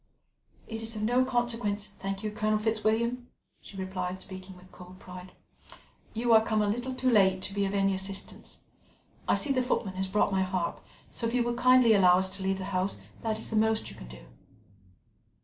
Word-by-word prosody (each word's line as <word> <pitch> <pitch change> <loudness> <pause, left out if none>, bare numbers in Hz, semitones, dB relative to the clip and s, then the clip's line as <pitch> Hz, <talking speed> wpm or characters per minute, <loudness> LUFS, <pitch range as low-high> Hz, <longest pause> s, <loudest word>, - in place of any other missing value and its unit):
"It 225 -1 -5
is 225 0 -5
of 210 - -3
no 245 +4 +3
consequence, 230 -5 -1
thank 195 +1 -4
you, 215 - -2
Colonel 215 0 +1
Fitzwilliam," 225 +3 0 0.3
she 195 - -12
replied, 185 -1 -4
speaking 185 0 -10
with 180 +1 -17
cold 180 0 -13
pride. 180 0 -11 0.8
"You 235 +1 +2
are 220 0 +7
come 215 -1 +1
a - - 0
little 245 +5 -2
too 255 0 +1
late 190 -4 +4
to 195 - -2
be 200 0 0
of 195 +1 -2
any 195 0 +2
assistance. 195 +1 -4 0.7
I - - +4
see 290 - +1
the 255 - +2
footman 205 -6 -1
has 190 0 0
brought 200 +1 +1
my 190 -1 +1
harp, 185 -2 -2 0.3
so 230 - -2
if 230 - -2
you 245 - +3
will 240 0 -1
kindly 255 -1 +5
allow 185 -3 +6
us 190 0 +1
to 195 - -7
leave 190 0 0
the 190 - -5
house, 185 +2 -1 0.2
that 220 -1 -1
is 220 - -6
the - - -1
most 220 0 +1
you - - -12
can - - -11
do." - - -12
210 Hz, 205 wpm, -29 LUFS, 190-230 Hz, 0.8 s, are